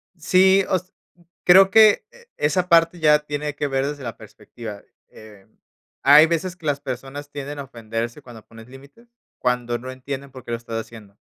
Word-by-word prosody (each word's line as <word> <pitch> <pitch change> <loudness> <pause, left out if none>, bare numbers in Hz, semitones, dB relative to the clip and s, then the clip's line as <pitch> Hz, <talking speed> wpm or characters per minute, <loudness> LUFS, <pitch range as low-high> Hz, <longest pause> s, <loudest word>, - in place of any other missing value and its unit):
Sí, 190 +3 +4
o - - +2
s 185 +2 -12 0.5
creo 190 +2 +7
que 220 - +5
e 485 0 -19
esa 180 +5 0
parte 165 +1 +4
ya 150 -1 +4
tiene 150 0 -5
que 145 0 -2
ver 135 0 -1
desde 145 -1 -6
la 115 -4 -6
perspectiva. 110 -4 -11 0.3
Eh, 105 -3 -16 0.6
hay 145 +3 +8
veces 175 +2 -2
que 165 - -12
las 145 -1 0
personas 135 +3 -7
tienden 145 0 -7
a 140 - -5
ofenderse 115 +1 -6
cuando 115 -4 -13
pones 115 +1 -15
límites, 140 - -17 0.3
cuando 120 -1 -1
no 130 +2 -8
entienden 135 +1 -7
por 130 -2 -13
qué - - -10
lo 115 - -1
estás 115 -1 -6
haciendo, 105 -3 -13
140 Hz, 185 wpm, -22 LUFS, 120-165 Hz, 0.6 s, hay